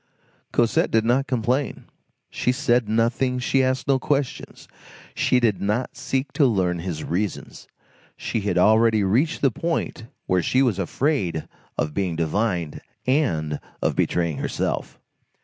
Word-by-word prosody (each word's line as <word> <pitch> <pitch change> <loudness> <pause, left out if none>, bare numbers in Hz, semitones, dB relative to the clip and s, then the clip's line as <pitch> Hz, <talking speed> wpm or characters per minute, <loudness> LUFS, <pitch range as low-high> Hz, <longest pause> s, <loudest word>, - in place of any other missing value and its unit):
Cosette 115 -1 +2
did 110 0 +2
not 130 +4 +2
complain, 125 +2 -1 0.5
she 125 - 0
said 125 -4 +1
nothing, 120 +3 +1
she 130 +1 +2
asked 130 +1 0
no 135 -1 +3
questions, 140 0 -2 0.5
she 125 - +2
did 115 -5 +1
not 105 +6 -1
seek 135 0 -2
to 140 - +4
learn 90 -6 +1
his 85 -3 -4
reasons; 95 +4 -3 0.5
she 115 - -2
had 100 - -1
already 110 -1 +4
reached 130 - +1
the 135 - +4
point 165 -5 -3 0.2
where 90 -1 +2
she 130 +10 +2
was 115 -7 +1
afraid 95 - -1 0.3
of 75 0 -1
being 90 -3 -1
divined, 85 0 -1 0.2
and 80 - +1 0.2
of - - 0
betraying 85 -4 0
herself. - - -3
115 Hz, 140 wpm, -23 LUFS, 95-130 Hz, 0.5 s, to